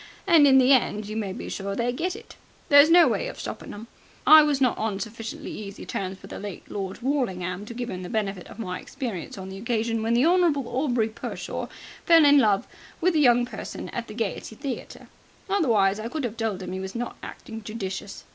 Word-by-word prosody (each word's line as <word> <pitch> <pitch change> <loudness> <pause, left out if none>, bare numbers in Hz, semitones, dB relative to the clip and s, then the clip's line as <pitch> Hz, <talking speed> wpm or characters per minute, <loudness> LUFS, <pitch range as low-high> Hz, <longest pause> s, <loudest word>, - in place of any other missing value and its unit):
And 330 -6 +6
in 265 -1 +6
the 260 +1 +6
end 215 -5 +1
you 215 - -6
may 210 -3 -2
be - - -7
sure 195 0 -4
they 240 +2 0
get 350 +9 -2
it. 455 +1 -12 0.3
There's 285 +2 +8
no 345 +1 +7
way - - 0
of - - -8
stoppin' - - -6
them. 210 +2 -8 0.4
I 310 0 +10
was 295 -2 +1
not 255 -3 +3
on 215 -3 -2
sufficiently 225 +1 -6
easy 205 -1 -8
terms 190 0 -4
with - - -11
the - - -6
late 200 -2 -8
Lord 195 +3 -5
Worlingham 195 -8 -2
to 235 - -7
give 245 0 -4
'im 185 - -5
the 180 - -7
benefit 200 -5 -2
of - - -12
my 180 -5 -4
experience 235 - -6
on 190 0 -7
the 190 0 -8
occasion 230 0 -1
when 225 +1 +1
the 245 +4 +4
Honourable 335 -7 +3
Aubrey 245 -3 0
Pershore 220 - -6 0.3
fell 330 -2 +6
in 285 0 +7
love 210 -5 +3 0.3
with 365 +1 +2
the 315 - +2
young 245 -3 +5
person - - -7
at 235 -1 -5
the 215 - -9
Gaiety 220 -1 -4
Theatre. 265 +2 -6 0.4
Otherwise 225 - +2
I 220 - -4
could 300 0 -3
'ave 230 - -3
told 220 -5 -2
'im 180 - -6
he 190 - -4
was 190 +2 -6
not 240 0 -4
acting 225 0 -8
judicious. 200 -2 -6
230 Hz, 220 wpm, -25 LUFS, 200-275 Hz, 0.4 s, I